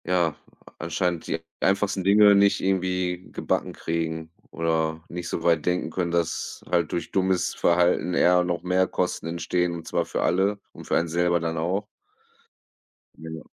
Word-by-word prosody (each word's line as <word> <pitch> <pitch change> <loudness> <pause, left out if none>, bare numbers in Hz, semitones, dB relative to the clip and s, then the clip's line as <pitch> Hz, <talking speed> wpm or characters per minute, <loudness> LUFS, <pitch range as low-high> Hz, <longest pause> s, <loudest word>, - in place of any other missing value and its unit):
Ja, 90 -2 +2
äh, - - -11 0.5
anscheinend 85 +1 -2
die 80 - -2 0.2
einfachsten 95 0 +1
Dinge 100 +2 +6
nicht 100 0 +4
irgendwie 90 -1 -1
gebacken - - -2
kriegen 80 -1 -3 0.2
oder 80 -1 -1
nicht 90 0 -5
so 80 - -3
weit 85 -3 +3
denken 90 0 0
können, 90 -2 -1
dass 85 -1 -2
halt 85 -3 +1
durch 85 - -3
dummes 95 -1 +1
Verhalten 90 +1 +2
eher 90 0 +4
noch 90 -1 -2
mehr 90 +1 +2
Kosten 90 -2 -2
entstehen, 85 +1 -1
und 85 -1 -7
zwar - - 0
für - - -2
alle 100 +3 +1
und - - -12
für - - +1
einen 85 - 0
selber 85 +1 +1
dann 80 0 -3
auch. 90 +6 -1 1.3
Genau. 80 0 -8
90 Hz, 165 wpm, -25 LUFS, 85-90 Hz, 1.3 s, Dinge